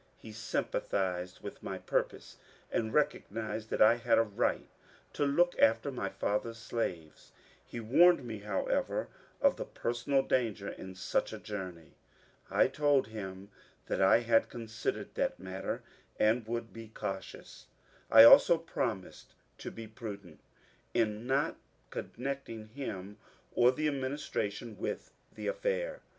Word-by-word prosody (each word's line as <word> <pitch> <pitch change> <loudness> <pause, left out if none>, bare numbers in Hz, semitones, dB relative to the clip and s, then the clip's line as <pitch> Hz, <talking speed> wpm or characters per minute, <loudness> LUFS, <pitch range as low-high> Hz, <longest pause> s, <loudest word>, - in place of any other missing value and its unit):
He 110 - -11
sympathized 95 -4 -2
with - - -8
my - - -4
purpose - - -2 0.3
and 110 -1 0
recognized 110 -6 -1
that - - +4
I 115 +2 +6
had 120 0 +3
a 115 - +5
right 105 -3 -1 0.5
to 145 - +1
look 175 +5 +3
after 115 +5 +4
my 110 -7 -3
father's 115 +4 -2
slaves. 90 -9 -4 0.3
He 120 - -7
warned 140 +6 +5
me, 110 -3 -5
however, 100 -1 -1 0.3
of - - +4
the - - -4
personal 135 +3 0
danger 110 -5 0
in 95 0 -8
such 90 - -1
a - - -5
journey. 90 -6 -7 0.6
I - - +4
told 140 -4 +2
him 100 -2 -7 0.3
that - - -1
I 95 +4 +6
had 115 -1 +3
considered 115 -2 -4
that - - -1
matter, 95 0 -4 0.4
uid 110 +1 +3
would 115 0 -4
be 115 -1 -9
cautious; 95 -3 -7 0.4
I 110 0 +10
also 165 +8 +9
promised 120 - -4 0.2
to - - -5
be 115 - -8
prudent 100 -7 -8 0.6
in 110 0 0
not 135 +3 +1 0.3
con - - -5
necting 125 -4 -5
him 105 -6 -6 0.4
or 120 +1 +5
the 155 +4 -1
administration 130 -6 -3
with - - -4 0.2
the - - -8
affair. - - -1
115 Hz, 135 wpm, -32 LUFS, 100-130 Hz, 0.6 s, I